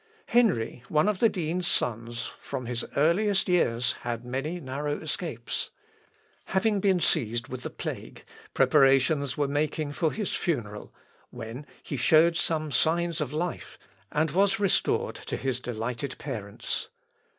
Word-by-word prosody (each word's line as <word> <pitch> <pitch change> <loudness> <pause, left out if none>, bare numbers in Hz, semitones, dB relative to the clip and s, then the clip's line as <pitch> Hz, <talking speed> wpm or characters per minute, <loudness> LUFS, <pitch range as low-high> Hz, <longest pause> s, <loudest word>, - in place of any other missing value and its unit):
Henry, 210 - +2
one 155 +5 +3
of 210 -3 +1
the 230 - +5
dean's 175 -1 -1
sons, 115 0 -1
from 130 -3 -5
his 120 0 -3
earliest 190 +7 +3
years, 125 -10 +2
had 120 0 -4
many 135 +8 -3
narrow 145 +1 -3
escapes. 155 -6 -4 0.8
Having 205 +2 +1
been 190 -2 +3
seized 120 -6 +1
with 130 0 -5
the - - -4
plague, - - -6 0.3
preparations 135 +1 +4
were 145 -1 +1
making 145 +1 -1
for 155 +2 0
his 210 -3 -3
funeral 105 - -2 0.4
when 120 +4 -8 0.2
he 140 - -4
showed 160 +6 +5
some 155 -2 0
signs 165 +4 +2
of 140 -3 -2
life, 170 +3 -3 0.3
and 155 0 +1
was 195 +4 +3
restored 200 -3 +1
to - - -5
his 130 -2 -1
delighted 125 +3 -4
parents. 115 - -4
145 Hz, 140 wpm, -28 LUFS, 125-170 Hz, 0.8 s, the